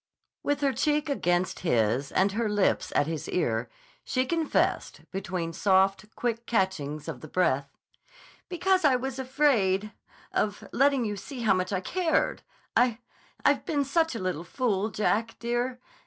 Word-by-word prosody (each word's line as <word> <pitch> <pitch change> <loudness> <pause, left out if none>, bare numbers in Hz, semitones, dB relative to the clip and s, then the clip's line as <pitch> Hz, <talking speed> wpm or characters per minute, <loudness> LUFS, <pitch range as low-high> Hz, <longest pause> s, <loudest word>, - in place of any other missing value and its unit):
With 290 0 -1
her 275 -2 +2
cheek 295 +4 +1
against 180 -9 0
his 125 -3 +1
and 195 +2 +2
her 220 +2 -1
lips 205 -1 +1
at - - +4
his 160 0 -4
ear, 115 -9 0 0.3
she 255 0 0
confessed, 325 +2 0
between 185 -3 -3
soft, 195 +3 +2
quick 235 -1 -2
catchings 165 -9 -1
of - - -6
the 155 - -8
breath: 145 -5 0 0.7
"Because 370 +1 +2
I 280 -4 +5
was 265 +1 -3
afraid—of 215 -6 0
letting 275 -2 +3
you 210 -1 -2
see 250 +5 -7
how 215 -4 +4
much 185 0 -1
I 190 -2 0
cared. 345 - 0 0.3
I—I've 245 -1 0
been 295 -6 0
such 320 0 +1
a - - -3
little 185 -4 -2
fool, 215 0 -1
Jack, 225 +2 0
dear. 240 +1 -2
215 Hz, 145 wpm, -28 LUFS, 185-265 Hz, 0.7 s, I